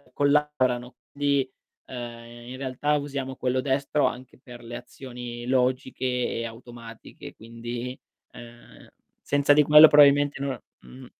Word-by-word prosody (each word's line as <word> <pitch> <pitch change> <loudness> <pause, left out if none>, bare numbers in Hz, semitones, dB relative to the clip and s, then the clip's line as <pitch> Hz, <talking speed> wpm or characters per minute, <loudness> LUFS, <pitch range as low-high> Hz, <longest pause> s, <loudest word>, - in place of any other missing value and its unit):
collaborano, 140 -4 0 0.2
quindi, 140 -2 0 0.4
ehm, 120 -1 -9
in 130 - -8
realtà 135 +3 -1
usiamo 140 -2 -5
quello 130 0 -1
destro 140 +2 0
anche 130 +1 -8
per 120 -1 -13
le 120 +1 -7
azioni 120 -1 -9
logiche 130 0 -1
e 125 -2 -2
automatiche 115 0 -11
quindi, 120 +2 -7 0.4
uhm, 120 0 -15 0.3
senza 145 0 +2
di 150 - +5
quello 150 +2 +9
probabilmente 145 -1 +5
no 135 -4 -3 0.2
Mh. 60 +1 -14
130 Hz, 125 wpm, -25 LUFS, 120-140 Hz, 0.4 s, quello